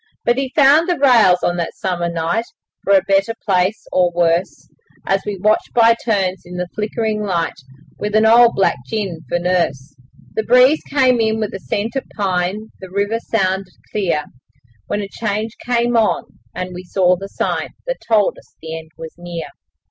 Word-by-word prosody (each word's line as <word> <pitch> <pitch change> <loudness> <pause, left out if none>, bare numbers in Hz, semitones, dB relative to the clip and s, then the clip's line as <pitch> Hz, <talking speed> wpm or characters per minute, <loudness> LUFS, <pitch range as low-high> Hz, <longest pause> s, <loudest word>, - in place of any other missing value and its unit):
But 240 +2 +2
he 270 -1 -2
found 300 +4 +5
the 350 - +1
rails 230 -10 +5
on 175 - +1
that 170 -1 -3
summer 175 -3 -2
night 170 +7 -1 0.4
For 200 - +2
a 190 -2 +5
better 195 +3 +1
place 190 +1 +1
or 180 -1 +3
worse, 170 +1 0 0.4
As 195 0 +1
we 205 -1 -3
watched 215 +3 +1
by 230 -1 +6
turns 190 -5 0
in 180 0 -9
the 180 0 -2
flickering 215 0 -2
light 170 -6 -2 0.4
With 210 0 -2
an 215 0 +4
old 235 +1 +6
black 195 - +2
gin 200 -7 -3
for - - +1
nurse. 170 -6 -1 0.4
The - - 0
breeze 250 +7 +5
came 260 -3 +3
in 220 0 +1
with 215 -2 -2
the 195 - -6
scent 215 +5 -3
of 270 - -1
pine, 195 +2 -1
The 190 - -10
river 200 +4 -1
sounded 190 -4 -1 0.2
clear, 175 -7 0 0.6
When 205 - -1
a - - -5
change 215 +1 -3
came 240 0 +1
on, 225 -2 +2 0.3
and 185 0 -4
we 180 +1 -7
saw 180 0 +2
the 195 +2 -8
sign - - -2 0.2
That - - -2
told 215 -3 +2
us - - -23
the 160 0 -6
end 160 0 -14
was 160 -1 -8
near. 175 -1 -6
200 Hz, 185 wpm, -18 LUFS, 180-225 Hz, 0.6 s, by